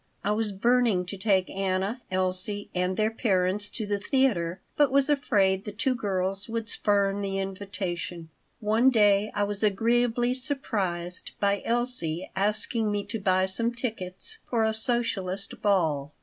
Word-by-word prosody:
I 205 Hz, -, 0 dB
was 215 Hz, 0 st, 0 dB
burning 230 Hz, -2 st, +2 dB
to 180 Hz, -, -6 dB
take 190 Hz, -2 st, +1 dB
Anna, 195 Hz, +5 st, -2 dB
Elsie, 185 Hz, +2 st, +1 dB
and 180 Hz, +1 st, -1 dB
their 215 Hz, +1 st, +1 dB
parents 205 Hz, -2 st, +1 dB
to 220 Hz, -, -4 dB
the 205 Hz, 0 st, -1 dB
theater, 200 Hz, -8 st, 0 dB, 0.2 s
but 290 Hz, -2 st, +4 dB
was 275 Hz, +1 st, +3 dB
afraid 195 Hz, -9 st, +2 dB
the 210 Hz, -, -6 dB
two 230 Hz, +5 st, 0 dB
girls 195 Hz, -3 st, -2 dB
would 225 Hz, 0 st, -3 dB
spurn 200 Hz, -2 st, +1 dB
the 195 Hz, -1 st, -2 dB
invitation 185 Hz, -4 st, -4 dB, 0.3 s
One 220 Hz, +4 st, +3 dB
day 210 Hz, -3 st, +3 dB
I 205 Hz, -, +1 dB
was 205 Hz, 0 st, -3 dB
agreeably 240 Hz, +3 st, +2 dB
surprised 205 Hz, -, -3 dB
by 200 Hz, 0 st, +1 dB
Elsie 230 Hz, -9 st, -1 dB
asking 210 Hz, +2 st, 0 dB
me 205 Hz, -1 st, -2 dB
to 225 Hz, +2 st, -5 dB
buy 185 Hz, -1 st, +2 dB
some 230 Hz, +5 st, +4 dB
tickets 225 Hz, -, -4 dB
for 230 Hz, -2 st, +1 dB
a 220 Hz, 0 st, +1 dB
socialist 220 Hz, -5 st, 0 dB
ball. 155 Hz, -8 st, +1 dB
205 Hz, 150 wpm, -27 LUFS, 190-230 Hz, 0.3 s, but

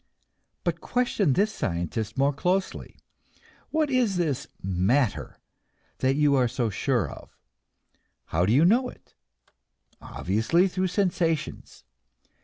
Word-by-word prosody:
But -, -, -2 dB
question 225 Hz, -, +1 dB
this 210 Hz, +8 st, +1 dB
scientist 95 Hz, -, -3 dB
more 140 Hz, +2 st, +2 dB
closely. 185 Hz, +6 st, -2 dB, 0.7 s
What 310 Hz, -2 st, 0 dB
is 245 Hz, -6 st, +2 dB
this 155 Hz, -7 st, -1 dB, 0.2 s
"matter" 95 Hz, +7 st, 0 dB, 0.6 s
that 130 Hz, +1 st, +2 dB
you 145 Hz, -1 st, +3 dB
are 130 Hz, -3 st, +3 dB
so 120 Hz, -2 st, -1 dB
sure 120 Hz, -, 0 dB
of? -, -, -12 dB, 0.9 s
How 85 Hz, +3 st, 0 dB
do -, -, +2 dB
you 140 Hz, +8 st, +5 dB
know 245 Hz, +7 st, +3 dB
it? -, -, -17 dB, 0.9 s
Obviously, 115 Hz, -, +1 dB
through 185 Hz, 0 st, -1 dB
sensations. 175 Hz, -4 st, -2 dB
145 Hz, 115 wpm, -26 LUFS, 115-190 Hz, 0.9 s, you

